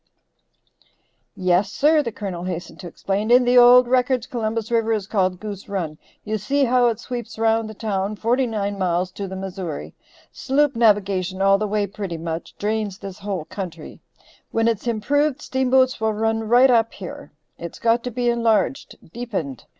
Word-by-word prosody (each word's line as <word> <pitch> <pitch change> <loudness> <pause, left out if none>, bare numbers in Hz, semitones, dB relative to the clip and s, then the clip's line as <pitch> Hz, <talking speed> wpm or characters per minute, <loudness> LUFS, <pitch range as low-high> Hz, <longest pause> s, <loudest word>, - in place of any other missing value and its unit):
"Yes, 185 +2 +1
sir," 305 +5 +3
the 235 -5 -4
Colonel 185 -5 -5
hastened 175 -2 -6
to 180 - -8
explain, 195 +5 -3
"in 245 +1 +6
the 245 +1 +3
old 245 +1 +7
records 250 -1 +1
Columbus 225 -2 -3
River 225 -1 +2
is 210 -3 -2
called 185 -3 0
Goose 205 -1 -7
Run. 165 -6 -4 0.2
You 215 0 -2
see 280 +7 +1
how 250 -1 +3
it 230 -2 -1
sweeps 240 -2 -6
round 225 0 +1
the 215 - -9
town 205 -2 -2
forty 245 +4 +1
nine 205 -3 -3
miles 180 0 0
to 200 +1 -6
the 190 - -7
Missouri; 180 - -6 0.4
sloop 280 0 +1
navigation 195 -4 +2
all 195 0 +4
the 215 - -1
way 205 0 0
pretty 195 -3 -6
much 165 0 -6
drains 210 -2 -2
this 195 -2 -9
whole 195 -5 -4
country; 170 -5 -8 0.5
when 225 0 +1
it's 230 0 -1
improved 280 +6 +1
steamboats 260 -2 +1
will 220 0 +1
run 225 +1 -1
right 250 +2 +6
up 230 -2 +2
here. 180 -5 -9 0.3
It's 170 -1 -7
got 230 +1 +1
to - - -1
be 245 +1 -2
enlarged, 235 +2 +1 0.2
deepened. 195 - -5
215 Hz, 175 wpm, -22 LUFS, 190-240 Hz, 0.5 s, old